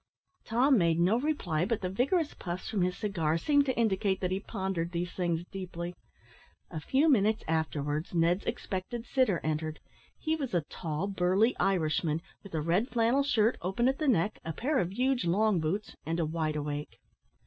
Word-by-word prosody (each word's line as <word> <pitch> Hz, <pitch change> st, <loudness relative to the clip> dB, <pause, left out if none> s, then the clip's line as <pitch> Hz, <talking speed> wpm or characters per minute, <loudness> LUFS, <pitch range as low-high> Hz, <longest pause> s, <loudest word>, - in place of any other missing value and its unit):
Tom 250 Hz, +2 st, +4 dB
made 170 Hz, -1 st, +2 dB
no 190 Hz, +7 st, +3 dB
reply, 225 Hz, -, 0 dB
but 225 Hz, +3 st, -1 dB
the 185 Hz, -, -1 dB
vigorous 280 Hz, -, +1 dB
puffs 175 Hz, 0 st, -5 dB
from 205 Hz, -, -1 dB
his 180 Hz, 0 st, 0 dB
cigar 165 Hz, -7 st, 0 dB
seemed 285 Hz, -, +3 dB
to 260 Hz, -, 0 dB
indicate 200 Hz, -4 st, +1 dB
that 180 Hz, -1 st, -1 dB
he 190 Hz, -, 0 dB
pondered 190 Hz, -5 st, -3 dB
these 175 Hz, +1 st, -2 dB
things 175 Hz, -2 st, -1 dB
deeply. 180 Hz, -2 st, -5 dB, 0.8 s
A 160 Hz, -, -4 dB
few 265 Hz, -, +2 dB
minutes 220 Hz, -6 st, +3 dB
afterwards, 155 Hz, -1 st, -1 dB
Ned's 170 Hz, +3 st, +2 dB
expected 230 Hz, 0 st, -4 dB
sitter 250 Hz, -, +2 dB
entered. 155 Hz, 0 st, -2 dB, 0.4 s
He 315 Hz, 0 st, 0 dB
was 270 Hz, -, -3 dB
a 175 Hz, -, +3 dB
tall 160 Hz, +1 st, -3 dB
burly 195 Hz, +4 st, +2 dB
Irishman, 165 Hz, -3 st, +1 dB, 0.2 s
with 200 Hz, -5 st, -9 dB
a 155 Hz, -, 0 dB
red 180 Hz, -, +1 dB
flannel 235 Hz, +3 st, +2 dB
shirt, 235 Hz, -5 st, +2 dB
open 195 Hz, +8 st, +1 dB
at 265 Hz, +1 st, +1 dB
the 305 Hz, -, 0 dB
neck, 215 Hz, -4 st, +2 dB
a 165 Hz, -, -4 dB
pair 275 Hz, -, 0 dB
of 175 Hz, 0 st, -1 dB
huge 255 Hz, +3 st, +1 dB
long 200 Hz, +2 st, +3 dB
boots, 180 Hz, +7 st, -2 dB
and 165 Hz, +4 st, -2 dB
a 165 Hz, -, +1 dB
wide 155 Hz, -1 st, -1 dB
awake. 145 Hz, 0 st, -4 dB
190 Hz, 180 wpm, -30 LUFS, 165-230 Hz, 0.8 s, Tom